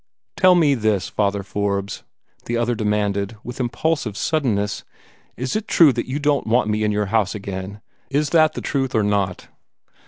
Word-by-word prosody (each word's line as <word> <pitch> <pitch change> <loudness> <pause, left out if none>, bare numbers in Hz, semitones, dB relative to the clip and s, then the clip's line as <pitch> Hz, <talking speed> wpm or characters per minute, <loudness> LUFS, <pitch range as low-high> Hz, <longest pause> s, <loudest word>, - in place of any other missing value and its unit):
"Tell 185 -1 +5
me 155 -5 +4
this, 110 -6 0
Father 100 -1 0
Forbes," 100 0 -2 0.4
the 120 - -1
other 120 +1 +1
demanded, 105 -1 -1
with 125 +1 -8
impulsive 125 -2 -1
suddenness, 110 -10 -1 0.5
"is 130 +1 -3
it 215 0 -2
true 155 -6 +6
that 120 - -3
you 130 +2 -2
don't 145 -3 0
want 115 +1 +2
me 105 0 0
in 105 - +1
your 105 0 0
house 110 -2 +2
again? 100 0 -6 0.3
Is 145 +1 0
that 155 -2 +4
the - - -5
truth 135 -2 -1
or 110 - +3
not?" 100 -3 -1
110 Hz, 175 wpm, -21 LUFS, 100-140 Hz, 0.5 s, true